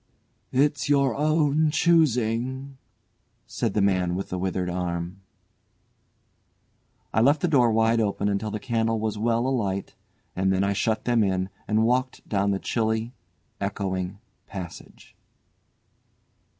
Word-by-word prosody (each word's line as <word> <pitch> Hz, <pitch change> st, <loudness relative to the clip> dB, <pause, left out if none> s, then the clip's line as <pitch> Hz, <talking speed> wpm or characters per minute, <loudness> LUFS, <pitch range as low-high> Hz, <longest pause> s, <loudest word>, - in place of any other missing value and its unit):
"It's 145 Hz, +1 st, +1 dB
your 140 Hz, -3 st, +3 dB
own 155 Hz, 0 st, +2 dB
choosing," 130 Hz, -4 st, +1 dB, 0.7 s
said -, -, -2 dB
the 105 Hz, -, +3 dB
man 90 Hz, -3 st, +1 dB
with 95 Hz, -, -4 dB
the 90 Hz, -, -3 dB
withered 90 Hz, 0 st, -1 dB
arm. 90 Hz, +1 st, -3 dB, 1.9 s
I 110 Hz, -, +3 dB
left 145 Hz, +5 st, +4 dB
the -, -, +2 dB
door 125 Hz, -7 st, +4 dB
wide 115 Hz, +1 st, +3 dB
open 100 Hz, -1 st, 0 dB
until 100 Hz, +1 st, -1 dB
the 105 Hz, -, -4 dB
candle 115 Hz, -1 st, 0 dB
was 110 Hz, -1 st, -2 dB
well 115 Hz, +2 st, +1 dB
alight, 100 Hz, -7 st, -1 dB, 0.4 s
and 95 Hz, +1 st, +1 dB
then 95 Hz, 0 st, +1 dB
I 100 Hz, 0 st, +1 dB
shut 110 Hz, +2 st, -1 dB
them 120 Hz, -2 st, +3 dB
in 95 Hz, -1 st, 0 dB, 0.2 s
and 110 Hz, +1 st, +2 dB
walked 125 Hz, +2 st, 0 dB
down 100 Hz, -1 st, +1 dB
the 100 Hz, -, +1 dB
chilly, 110 Hz, +3 st, -1 dB, 0.5 s
echoing 95 Hz, -1 st, -3 dB, 0.3 s
passage. 90 Hz, -4 st, -9 dB
110 Hz, 130 wpm, -25 LUFS, 95-130 Hz, 1.9 s, left